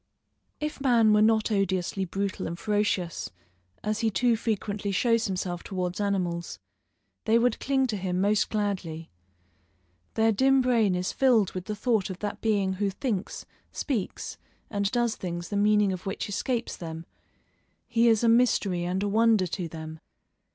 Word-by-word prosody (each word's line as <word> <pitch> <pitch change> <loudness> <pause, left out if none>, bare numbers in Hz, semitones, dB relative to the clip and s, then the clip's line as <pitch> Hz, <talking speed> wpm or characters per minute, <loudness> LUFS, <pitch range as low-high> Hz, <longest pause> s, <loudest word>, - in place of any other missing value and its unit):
If 300 -2 -4
man 235 -5 +4
were 210 - +4
not 220 0 +3
odiously 190 -1 0
brutal 195 +2 -3
and 170 +1 -5
ferocious, 205 -5 -1 0.5
as 215 0 -1
he 225 - +2
too 240 +3 +2
frequently 210 -2 -2
shows 230 +3 +2
himself 180 -2 -3
towards 180 0 -3
animals, 175 - -2 0.7
they 225 - +4
would 240 -1 +2
cling 270 -1 +1
to 225 -5 -2
him 180 -1 -2
most 205 +2 +2
gladly. 190 -7 -3 1.0
Their 225 0 +3
dim 265 +5 +4
brain 230 -7 +2
is 180 +1 -1
filled 240 -7 +3
with 185 -1 -6
the 210 - -4
thought 215 -2 0
of 185 - -5
that 205 +1 -5
being 200 -4 +1
who 200 +1 -1
thinks, 200 -1 -3 0.3
speaks, 240 -10 -3 0.3
and 200 -2 0
does 240 0 0
things 175 -1 -5
the 205 - -3
meaning 205 -1 +3
of 185 +2 -7
which 195 - -3
escapes 235 +4 -2
them; 165 -1 -7 0.8
he 235 0 +3
is 225 -1 +4
a - - +4
mystery 225 -6 +3
and 185 +2 -1
a - - 0
wonder 220 -1 +3
to 175 0 -4
them. 160 0 -8
205 Hz, 160 wpm, -27 LUFS, 185-225 Hz, 1.0 s, man